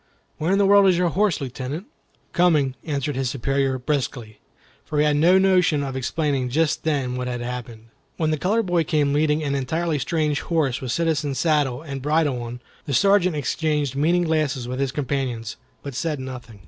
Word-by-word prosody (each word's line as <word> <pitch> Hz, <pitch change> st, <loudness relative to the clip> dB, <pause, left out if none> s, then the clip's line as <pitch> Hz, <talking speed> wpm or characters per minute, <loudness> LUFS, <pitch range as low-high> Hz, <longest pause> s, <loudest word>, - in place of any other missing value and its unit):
Where 160 Hz, +4 st, 0 dB
in 195 Hz, -, +3 dB
the 200 Hz, -, +3 dB
world 200 Hz, 0 st, +6 dB
is 185 Hz, -2 st, +4 dB
your 180 Hz, -1 st, +2 dB
horse, 195 Hz, 0 st, +1 dB
Lieutenant?" 135 Hz, -, -5 dB, 0.5 s
"Coming," 155 Hz, -7 st, +3 dB
answered 145 Hz, -2 st, -2 dB
his 130 Hz, -1 st, -1 dB
superior, 135 Hz, +1 st, 0 dB
briskly, 125 Hz, -5 st, -3 dB, 0.4 s
for 150 Hz, -, -4 dB
he 150 Hz, -, +4 dB
had 150 Hz, -1 st, +2 dB
no 175 Hz, +5 st, +5 dB
notion 180 Hz, -6 st, +3 dB
of 135 Hz, -1 st, -4 dB
explaining 135 Hz, -1 st, -1 dB
just 155 Hz, +4 st, 0 dB
then 135 Hz, -5 st, 0 dB
what 125 Hz, 0 st, -3 dB
had 120 Hz, -1 st, -3 dB
happened. 120 Hz, -2 st, -7 dB, 0.3 s
When 155 Hz, -2 st, +1 dB
the 155 Hz, -, -1 dB
colored 215 Hz, +6 st, +1 dB
boy 175 Hz, -2 st, +2 dB
came 145 Hz, -2 st, +1 dB
leading 150 Hz, +1 st, +2 dB
an 140 Hz, -2 st, -1 dB
entirely 155 Hz, +4 st, -1 dB
strange 150 Hz, +1 st, 0 dB
horse 150 Hz, -7 st, 0 dB
with 130 Hz, -2 st, -3 dB
citizen 155 Hz, -2 st, 0 dB
saddle 145 Hz, -2 st, +1 dB
and 140 Hz, -4 st, -6 dB
bridle 145 Hz, -3 st, +1 dB
on, 120 Hz, +1 st, -7 dB, 0.3 s
the 140 Hz, -, 0 dB
Sergeant 185 Hz, +2 st, +3 dB
exchanged 150 Hz, -1 st, -1 dB
meaning 170 Hz, +5 st, +2 dB
glances 155 Hz, -6 st, 0 dB
with 130 Hz, +1 st, -4 dB
his 135 Hz, -1 st, 0 dB
companions, 130 Hz, -5 st, -3 dB, 0.3 s
but 140 Hz, -, -6 dB
said 150 Hz, +3 st, -2 dB
nothing. 125 Hz, -5 st, -8 dB
145 Hz, 185 wpm, -23 LUFS, 130-160 Hz, 0.5 s, world